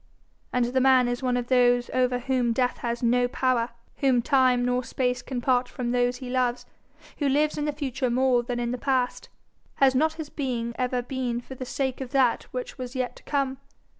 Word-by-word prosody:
And 250 Hz, -1 st, +2 dB
the 255 Hz, +2 st, +1 dB
man 260 Hz, -1 st, +5 dB
is 245 Hz, +1 st, -2 dB
one 250 Hz, -1 st, +1 dB
of 245 Hz, -, -2 dB
those 245 Hz, -1 st, +3 dB
over 250 Hz, -1 st, +2 dB
whom 245 Hz, -1 st, 0 dB
death 250 Hz, +1 st, 0 dB
has 235 Hz, 0 st, -3 dB
no 245 Hz, +1 st, +3 dB
power; 250 Hz, -2 st, 0 dB, 0.3 s
whom 255 Hz, -4 st, +2 dB
time 255 Hz, -3 st, +3 dB
nor 250 Hz, 0 st, 0 dB
space 250 Hz, 0 st, -1 dB
can 255 Hz, -2 st, -4 dB
part 250 Hz, 0 st, +2 dB
from 240 Hz, -1 st, -3 dB
those 245 Hz, 0 st, +1 dB
he 255 Hz, 0 st, -8 dB
loves; 250 Hz, -1 st, 0 dB, 0.5 s
who 285 Hz, -2 st, +1 dB
lives 300 Hz, +2 st, +2 dB
in 295 Hz, -, -2 dB
the 300 Hz, -, 0 dB
future 275 Hz, -3 st, -2 dB
more 250 Hz, 0 st, +3 dB
than 240 Hz, 0 st, -4 dB
in 240 Hz, 0 st, -1 dB
the 250 Hz, -, -3 dB
past! 260 Hz, -2 st, -1 dB, 0.5 s
Has 270 Hz, -1 st, +4 dB
not 310 Hz, +4 st, +2 dB
his 315 Hz, -2 st, -7 dB
being 240 Hz, -5 st, -3 dB
ever 250 Hz, -1 st, -1 dB
been 250 Hz, -2 st, -2 dB
for 245 Hz, -, -10 dB
the 255 Hz, 0 st, -6 dB
sake 265 Hz, 0 st, -2 dB
of 255 Hz, -2 st, -6 dB
that 260 Hz, -4 st, +2 dB
which 250 Hz, +1 st, -6 dB
was 250 Hz, +1 st, -6 dB
yet 255 Hz, -1 st, -2 dB
to -, -, -17 dB
come? 275 Hz, -2 st, -1 dB
250 Hz, 210 wpm, -26 LUFS, 245-265 Hz, 0.5 s, man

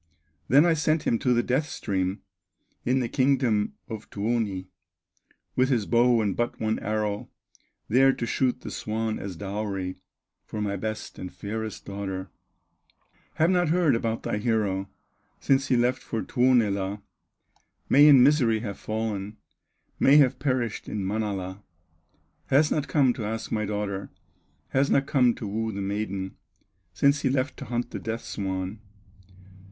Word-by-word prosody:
Then 145 Hz, +6 st, +6 dB
I 170 Hz, -, +4 dB
sent 155 Hz, 0 st, +1 dB
him 115 Hz, -, +1 dB
to 125 Hz, -, +1 dB
the 120 Hz, 0 st, +3 dB
Death 140 Hz, +5 st, 0 dB
stream, 95 Hz, -1 st, -2 dB, 0.6 s
In 130 Hz, +2 st, +2 dB
the 120 Hz, -, -1 dB
kingdom 130 Hz, -5 st, +1 dB
of 110 Hz, -1 st, -7 dB
Tuoni, 105 Hz, -3 st, -1 dB, 0.9 s
With 130 Hz, +1 st, +3 dB
his 120 Hz, -6 st, +1 dB
bow 120 Hz, 0 st, +4 dB
and 100 Hz, -3 st, 0 dB
but 120 Hz, 0 st, -2 dB
one 110 Hz, 0 st, 0 dB
arrow, 105 Hz, -1 st, -2 dB, 0.6 s
There 135 Hz, +4 st, +5 dB
to 120 Hz, -, -3 dB
shoot 125 Hz, +2 st, 0 dB
the -, -, -7 dB
swan 110 Hz, 0 st, -2 dB
as 95 Hz, -2 st, -6 dB
dowry 95 Hz, 0 st, -4 dB, 0.5 s
For 110 Hz, -, -6 dB
my 100 Hz, -1 st, -1 dB
best 110 Hz, +2 st, -5 dB
and 90 Hz, -, -6 dB
fairest 110 Hz, +1 st, -5 dB
daughter; 95 Hz, -2 st, -5 dB, 1.0 s
Have 165 Hz, +3 st, +3 dB
not 175 Hz, -3 st, +2 dB
heard 170 Hz, -4 st, +3 dB
about 115 Hz, -1 st, -1 dB
thy 105 Hz, -, -1 dB
hero 105 Hz, -4 st, 0 dB, 0.5 s
Since 135 Hz, 0 st, +2 dB
he 125 Hz, -, +3 dB
left 120 Hz, +1 st, +1 dB
for 115 Hz, -, -3 dB
Tuonela; 105 Hz, -6 st, +1 dB, 0.8 s
May 145 Hz, +2 st, +7 dB
in 135 Hz, -4 st, +8 dB
misery 125 Hz, -6 st, +3 dB
have 100 Hz, -4 st, -5 dB
fallen, 110 Hz, -1 st, -3 dB, 0.6 s
May 140 Hz, +2 st, +6 dB
have 135 Hz, -3 st, +4 dB
perished 130 Hz, -5 st, -1 dB
in 100 Hz, -3 st, -3 dB
Manala; 100 Hz, -2 st, -3 dB, 0.9 s
Has 150 Hz, +3 st, +4 dB
not 150 Hz, -2 st, 0 dB
come 135 Hz, -3 st, +3 dB
to 115 Hz, -, -6 dB
ask 110 Hz, +1 st, -4 dB
my 105 Hz, -1 st, 0 dB
daughter, 100 Hz, -1 st, -3 dB, 0.6 s
Has 135 Hz, +1 st, +2 dB
not 135 Hz, -, +3 dB
come 125 Hz, -4 st, +3 dB
to -, -, -6 dB
woo 110 Hz, +2 st, -2 dB
the 100 Hz, -, -5 dB
maiden, 100 Hz, -1 st, -3 dB, 0.5 s
Since 140 Hz, +9 st, +2 dB
he 135 Hz, -, +1 dB
left 130 Hz, +1 st, 0 dB
to -, -, -7 dB
hunt 120 Hz, 0 st, -3 dB
the -, -, -4 dB
death 115 Hz, +1 st, -4 dB
swan." 95 Hz, +1 st, -4 dB
110 Hz, 155 wpm, -26 LUFS, 100-130 Hz, 1.0 s, in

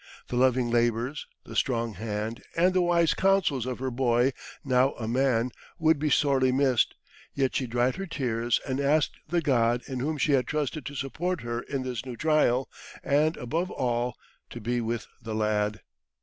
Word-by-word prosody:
The -, -, -3 dB
loving 125 Hz, -1 st, +3 dB
labours, 120 Hz, +4 st, 0 dB, 0.2 s
the -, -, -10 dB
strong 115 Hz, -4 st, 0 dB
hand, 110 Hz, +2 st, -4 dB, 0.2 s
and 180 Hz, +2 st, +4 dB
the 185 Hz, -, +3 dB
wise 170 Hz, -2 st, +3 dB
counsels 185 Hz, -10 st, +2 dB
of 125 Hz, -, -3 dB
her 130 Hz, 0 st, -3 dB
boy, 120 Hz, +1 st, +2 dB, 0.3 s
now 130 Hz, 0 st, +3 dB
a 110 Hz, -, -6 dB
man, 125 Hz, 0 st, +1 dB, 0.3 s
would 160 Hz, -3 st, +3 dB
be 150 Hz, +1 st, 0 dB
sorely 135 Hz, -2 st, +3 dB
missed, 130 Hz, -3 st, +2 dB, 0.4 s
yet 135 Hz, -2 st, 0 dB
she 130 Hz, -, 0 dB
dried 120 Hz, +5 st, +1 dB
her 195 Hz, 0 st, -4 dB
tears, 120 Hz, -6 st, 0 dB
and 130 Hz, 0 st, -1 dB
asked 145 Hz, +2 st, +2 dB
the 170 Hz, +2 st, +1 dB
God 120 Hz, -4 st, +2 dB
in 130 Hz, -2 st, -4 dB
whom 150 Hz, +4 st, -1 dB
she 150 Hz, -, +1 dB
had 130 Hz, -3 st, +2 dB
trusted 150 Hz, -2 st, -2 dB
to 145 Hz, -, -7 dB
support 160 Hz, +6 st, -2 dB
her 120 Hz, 0 st, -3 dB
in 135 Hz, 0 st, -4 dB
this 125 Hz, -3 st, -4 dB
new 125 Hz, -2 st, -7 dB
trial, 150 Hz, -4 st, +2 dB, 0.4 s
and, 150 Hz, +3 st, +2 dB
above 165 Hz, +9 st, -2 dB
all, 120 Hz, 0 st, -1 dB, 0.3 s
to 120 Hz, -, -8 dB
be 120 Hz, +2 st, -1 dB
with 115 Hz, +1 st, -2 dB, 0.2 s
the 110 Hz, -1 st, -5 dB
lad. 105 Hz, -1 st, 0 dB
130 Hz, 180 wpm, -27 LUFS, 120-145 Hz, 0.4 s, and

